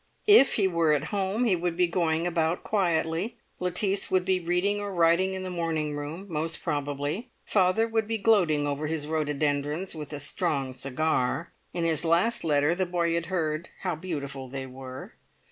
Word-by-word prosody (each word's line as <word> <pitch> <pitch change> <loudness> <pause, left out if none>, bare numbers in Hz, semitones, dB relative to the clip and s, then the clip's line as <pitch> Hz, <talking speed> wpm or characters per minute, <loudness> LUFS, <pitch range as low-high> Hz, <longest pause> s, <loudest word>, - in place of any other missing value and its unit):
If 410 -10 +7
he 200 -3 +3
were 170 -4 +2
at 150 0 -1
home, 200 +3 0
he 220 -6 +3
would 175 -1 -2
be 180 - +4
going 170 -1 0
about 165 -1 0
quietly. 180 +2 0 0.2
Lettice 190 +2 0
would 185 -1 +2
be 190 -1 +2
reading 180 +4 0
or 205 -1 -4
writing 175 +2 +3
in 190 - -4
the 185 - -4
morning 160 -4 -1
room, 150 +6 -5
most 165 -1 -3
probably. 145 - -2 0.2
Father 195 +3 +3
would 225 -1 0
be 225 0 -1
gloating 180 -9 +3
over 145 +1 -2
his 155 -1 -2
rhododendrons 150 +2 -1
with 150 -2 -7
a 145 - -4
strong 140 -3 0
cigar; 135 +3 -1 0.2
in 170 - -2
his 165 -3 +1
last 170 +8 +2
letter 150 0 +3
the 185 +1 -1
boy 170 -1 0
had 170 0 -1
heard 165 -3 -2
how 180 -3 -1
beautiful 140 -6 -5
they 135 +1 -5
were. 130 0 -9
165 Hz, 180 wpm, -27 LUFS, 150-185 Hz, 0.2 s, If